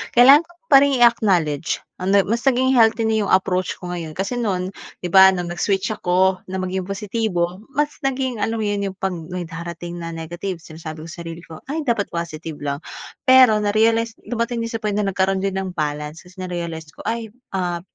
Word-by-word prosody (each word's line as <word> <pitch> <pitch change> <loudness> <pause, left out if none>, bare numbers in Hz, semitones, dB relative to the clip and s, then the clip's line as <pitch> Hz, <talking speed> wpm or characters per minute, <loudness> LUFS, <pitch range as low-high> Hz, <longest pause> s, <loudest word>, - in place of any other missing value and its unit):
Kailangan 275 +7 +8
ko - - -19 0.2
pa 280 - +9
ring 275 -3 +1
i-acknowledge, 180 -10 +2 0.2
ah, 185 - -4
na 200 +1 +5
mas 230 +6 -2
naging 260 0 +3
healthy 225 0 +5
na 220 -1 +1
yung - - -2
approach 185 -1 +2
ko 180 - -6
ngayon. 170 -3 -5
Kasi 195 +8 -3
no'n, 185 -5 -1 0.3
'di 180 - -3
ba, 190 0 +8
nung 175 -2 -3
nag-switch 195 +3 0
ako 185 -2 +2
na 190 - -5
maging 185 0 -2
positibo, 195 -3 -2 0.2
mas 295 +1 0
naging 260 -2 -1
alam 220 +2 -1
mo - - 0
yun, 205 -1 -1
yung 195 - -3
'pag 190 0 -1 0.2
may 180 -1 -3
darating 170 +1 -6
na 165 0 -5
negative 175 +2 -5
sinasabi 160 -1 -9
ko 165 - -9
sarili 165 0 -8
ko, 160 -3 -11
"Ay, 310 +4 -2
dapat 235 -8 0
positive 165 -1 -4
lang." 140 -1 -2 0.5
Pero 255 -4 +7
narealize 225 +2 +2
dumating 235 0 -2
din 230 - -3
sa 225 - -2
point 215 -2 -2
na 205 -1 0
nagkaroon 190 0 +1
din 195 -1 -1
ng 190 -1 -3
balance. 150 0 -3
Kasi 180 +2 -18
narealize 170 -4 -5
ko - - -12
ay, 225 -2 -4 0.2
ah, 175 -2 -2
190 Hz, 200 wpm, -21 LUFS, 175-225 Hz, 0.5 s, pa